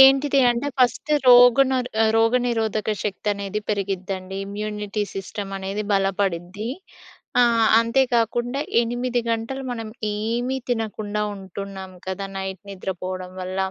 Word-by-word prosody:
ఏంటిది 270 +1 +7
అంటే 240 +4 -1
ఫస్ట్ 255 +4 +2 0.2
రోగనర్ 250 +1 +6 0.3
రోగనిరోధక 225 -2 +1
శక్తి 210 +1 -3
అనేది 200 +1 -3
పెరిగిద్దండి. 195 -2 -3
ఇమ్యూనిటీ 210 0 -3
సిస్టమ్ 195 +1 -5
అనేది 195 +2 -3
బలపడిద్ది. 195 +1 0 0.7
ఆహ్, 230 -2 +4
అంతే 230 +4 +3
గాకుండా 240 +3 +1 0.2
8 240 +1 -1
గంటలు 230 +4 -2
మనం 225 -2 -5 0.2
ఏమి 235 +5 -1
తినకుండా 215 -3 -2
ఉంటున్నాం 190 0 -8
కదా! 190 +1 -3
నైట్ 190 -1 -5
నిద్ర 190 0 -4
పోవడం 185 0 -4
వల్ల 185 +1 -4
215 Hz, 115 wpm, -23 LUFS, 195-240 Hz, 0.7 s, ఏంటిది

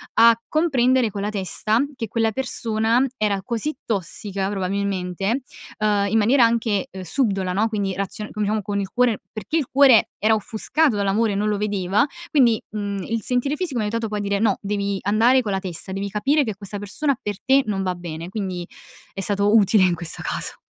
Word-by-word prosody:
a 230 0 +6
comprendere 260 -7 +2
con 200 - -5
la 205 - -1
testa 215 +2 0 0.2
che 225 -4 -4
quella 225 +1 0
persona 230 0 +1
era 200 -3 0
così 240 +7 -2
tossica 195 -1 -3
probabilmente, 195 +3 -2 0.4
uhm, 205 -2 +1
in 225 - +2
maniera 235 +4 +4
anche, 225 -4 0
uhm, 190 0 -8
subdola, 195 -4 0
no, 215 +4 +2
quindi 200 -3 -1
razio 200 +2 -4
come 210 -1 -2
diciamo 210 0 -1
con 200 +1 -2
il 195 -1 -3
cuore 245 -3 +1
perché 220 +9 -3
il 290 - -1
cuore 265 -5 +6
era 220 +2 +3
offuscato 235 +6 +1
dall'amore 200 +1 +1
non 210 +1 0
lo 205 - 0
vedeva. 205 +3 +1 0.3
Quindi, 240 -7 +4
mhmm, 200 -2 -3
il 225 +2 -2
sentire 250 +4 0
fisico 315 -10 -2
mi - - 0
ha 210 - -1
aiutato 230 0 -2
poi 210 0 -3
a - - -2
dire: 200 0 -1
"No, 225 - +2
devi 200 -1 -2
andare 230 +6 +4
con 210 -4 -3
la 190 - 0
testa, 185 0 -5
devi 195 +1 -3
capire 275 +9 +2
che 215 -3 -3
questa 205 0 -7
persona 270 +7 -1
per 205 -2 -4
te 270 +1 +4
non 195 -2 -2
va 185 -1 -1
bene 170 0 -7
quindi 185 -4 -4 0.5
è 195 - -7
stato 205 +1 +1
utile 205 -2 +5
in 180 -1 +3
questo 165 0 -6
caso. - - -4
210 Hz, 200 wpm, -22 LUFS, 195-230 Hz, 0.5 s, a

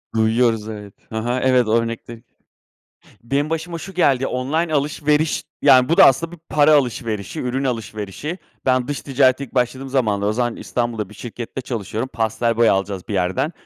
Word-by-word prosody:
Duyuyoruz, 110 0 +2
evet, 105 -2 -8 0.2
hı 110 - -5
hı. 120 +3 -1
Evet, 125 -3 +3
o - - 0
örnekte 115 0 -4 1.0
Benim 140 +5 -1
başıma 165 +1 -3
şu 190 +4 -9
geldi, 135 -7 +2
online 155 +6 -1
alışveriş, 150 +1 +1 0.2
yani, 130 -2 +6
bu 165 - +2
da - - +9
aslında 165 +5 +3
bir 175 - -10
para 150 +1 +4
alışverişi, 120 -2 -1
ürün 130 +2 -2
alışverişi. 115 - -4 0.3
Ben, 130 -1 +2
dış 145 -1 -3
ticarete 135 -1 +2
ilk 135 - -11
başladığım 130 +2 -1
zamanlar, 105 -7 +1
o 105 - +1
zaman 120 0 -1
İstanbul'da 115 -5 -3
bir - - -13
şirkette 120 +3 -7
çalışıyorum. 115 0 -4
Pastel 115 +1 0
boya 115 -1 +5
alacağız 95 -1 -3
bir - - -4
yerden, 95 - 0
125 Hz, 170 wpm, -20 LUFS, 110-140 Hz, 1.0 s, da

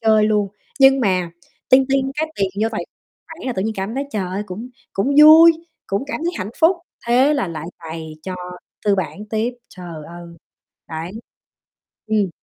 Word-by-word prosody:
chơi 220 -2 +4
luôn, 210 -1 +2 0.3
nhưng 270 0 +7
mà 185 -6 +1 0.4
ting 265 +1 +6
ting 270 0 +1
cái 315 +1 -1
tiền 195 -1 +1
vô 225 - +2
tài 215 - -3 0.4
khoản 325 -3 -10
là 255 - 0
tự 190 - -2
nhiên 220 +2 -2
cảm 195 +4 -3
thấy, 275 +2 -2
trời 210 -7 -2
ơi, 195 +3 -3
cũng 210 +6 -7 0.2
cũng 265 +9 0
vui, 320 +2 +10 0.3
cũng 200 +7 -1
cảm 290 - -4
thấy 345 - 0
hạnh 190 +2 -4
phúc. 335 +3 +5 0.3
Thế 260 +5 +4
là 250 -10 -1
lại 160 -1 -6
cày 160 -1 -7
cho 185 +2 -5 0.5
tư 205 - +4
bản 195 +2 -4
tiếp. 225 +3 -1
Trời 170 -4 -9
ơi. 175 0 -10 0.6
Đấy. 160 +1 -5 1.0
Ừm. 215 -3 +1
215 Hz, 185 wpm, -20 LUFS, 185-270 Hz, 1.0 s, vui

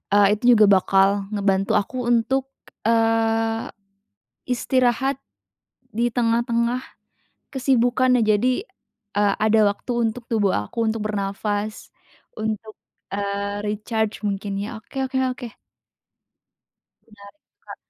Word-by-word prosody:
eee, 205 -1 +6
itu 245 +1 +5
juga 215 -1 +6
bakal 195 +1 +3
ngebantu 195 -1 +1
aku 245 +4 -1
untuk, 250 +3 +1 0.4
eee, 225 0 +1 0.8
istirahat 255 +2 +1 0.8
di 235 +1 +1
tengah-tengah 235 +1 0 0.7
kesibukan 255 -1 +2
nah 225 - +3
jadi, 250 - +1 0.5
eee, 205 -1 +3
ada 215 +1 +3
waktu 245 - -6
untuk 235 +1 -2
tubuh 210 -4 +1
aku 105 - -2
untuk 220 -1 -1
bernafas, 205 +1 -3 0.5
untuk, 220 0 -4 0.4
eee, 200 0 -3
recharge 215 +1 -2
mungkin 200 -1 -3
ya, 215 +3 -5
oke 265 +4 -5
oke 260 0 -2
oke. 250 0 -8 1.6
Benar, 210 -3 -19 0.4
Kak. - - -11
225 Hz, 105 wpm, -22 LUFS, 205-240 Hz, 1.6 s, eee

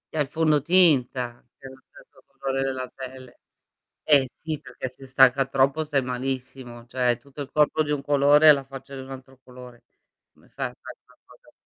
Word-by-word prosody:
È - - -1
il 145 - +1
fondotinta 145 -6 +2
dello 130 -1 -13
stesso 135 - -20
colore 135 0 -3
della 130 -1 -3
pelle. 130 -1 -11 0.6
Eh 145 -3 +4
si, 160 -1 -5
perché - - -7
se 130 +2 -13
stacca 130 +1 +4
troppo 135 +3 +1
stai 150 -3 0
malissimo, 125 -1 -5
cioè 125 -1 0
tutto 140 +4 -12
il 140 - -7
corpo 155 +1 +2
di 150 - -4
un 145 -2 -1
colore 145 +2 +4
e 150 - +10
la 140 -1 -3
faccia 135 +1 -11
di 135 - -7
un 130 +1 -11
altro 130 0 -11
colore. 125 -1 -14 0.5
Come - - -26
fai - - -4
a - - -12
fare - - -11
una - - -26
cosa - - -21
135 Hz, 185 wpm, -24 LUFS, 130-145 Hz, 0.6 s, e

